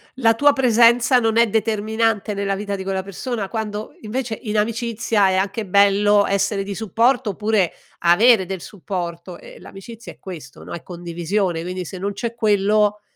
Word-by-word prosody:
la 230 -3 +3
tua 290 +5 +4
presenza 245 -1 +4
non 225 -1 0
è 235 0 +5
determinante 220 0 0
nella 200 0 -2
vita 200 0 -4
di 190 - -6
quella 190 0 -2
persona 200 +2 -5
quando 215 -1 -5
invece 225 +1 -4
in 215 -3 -3
amicizia 225 -1 0
è 185 - +1
anche 200 +2 -2
bello 200 +1 +4
essere 200 0 0
di 200 0 -5
supporto 230 +3 +1
oppure 210 -2 0 0.3
avere 190 +4 +5
del 190 -2 -4
supporto 175 -3 -6
e - - -14
l'amicizia 225 +4 -11
è - - -28
questo, 160 -8 -10
no, - - -9
è 170 - -6
condivisione, 175 +1 -3
quindi 180 +1 -5
se 185 +3 -8
non 200 +2 -2
c'è 235 +3 -4
quello 210 -1 +1
210 Hz, 170 wpm, -20 LUFS, 190-225 Hz, 0.3 s, è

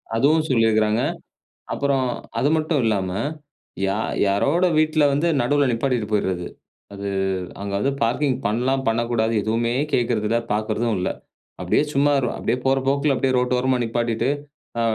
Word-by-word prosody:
அதுவும் 155 +7 +3
சொல்லியிருக்கிறாங்க. 110 -2 +3 0.7
அப்புறம் 140 -2 +1 0.3
அது 145 - +2
மட்டும் 155 -2 0
இல்லாம 95 -4 0 0.8
யார் 105 +3 -1
யாரோட 140 - +2
வீட்ல 155 0 +2
வந்து 150 +5 +1
நடுவுல 145 +3 +2
நிப்பாட்டிட்டு 120 -2 -1
போயிறது. 95 -4 0 0.5
அது 100 0 -6 0.5
அங்க 100 0 -4
அது 135 - +2
பார்க்கிங் 125 +3 +1
பண்ணலாம், 130 +5 0
பண்ணக்கூடாது 115 0 +1
எதுவுமே 115 +2 0 0.2
கேட்கிறது 115 -4 +1
இல்ல. 115 +1 +2
பார்க்கறதும் 110 +1 -1
இல்ல. 90 - -1 0.5
அப்பிடியே - - +2
சும்மா 145 +1 +3
ர் - - +1
அப்பிடியே - - -1
போற 135 0 +3
போக்குல 140 +1 +2
அப்பிடியே 130 -1 +1
ரோட்டு 125 0 +1
ஓரமா 130 0 +1
நிப்பாட்டிட்டு, 115 +1 -1 0.5
ஆ - - +1
120 Hz, 140 wpm, -22 LUFS, 110-140 Hz, 0.8 s, அதுவும்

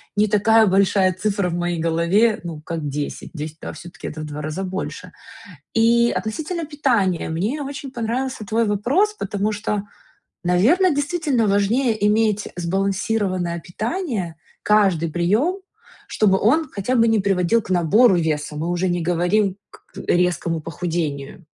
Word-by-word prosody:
не 210 +1 +3
такая 220 +2 +4
большая 190 0 +3
цифра 195 0 -1
в 170 - -3
моей 175 -1 -1
голове, 170 +7 +2
ну, 165 -3 -6
как 160 -1 -4
10, 145 +5 -5
10 155 -1 -7
а - - -5
всё-таки 175 0 -9
это 155 - -6
в - - -5
2 150 0 -6
раза 155 +5 -3
больше. 190 +1 -5 0.6
И 235 +1 +4
относительно 315 +10 -3
питания, 245 - 0
мне 205 - -2
очень 275 0 -6
понравился 240 0 -3
твой 225 +3 +1
вопрос, 245 - +1
потому 205 +2 -1
что, 210 -1 -2 0.6
наверно, 240 - +4
действительно 285 -6 0
важнее 220 +5 +2
иметь, 210 -1 +2
э, - - -8
сбалансированное 190 0 -1
питание, 215 - -3 0.3
каждый 190 -6 +3
приём, 215 - +1 0.5
чтобы 195 -3 +2
он 285 +8 +2
хотя 205 +5 -2
бы 230 -2 +4
не 225 -1 +3
приводил 195 +2 +2
к 210 - -12
набору 190 +6 +4
веса. 155 -3 -1
Мы 160 +3 -3
уже 175 +1 0
не 175 -1 -1
говорим 180 +4 +1
к - - -17 0.2
резкому 175 -2 +1
похудению. 165 0 -4
195 Hz, 145 wpm, -21 LUFS, 175-230 Hz, 0.6 s, такая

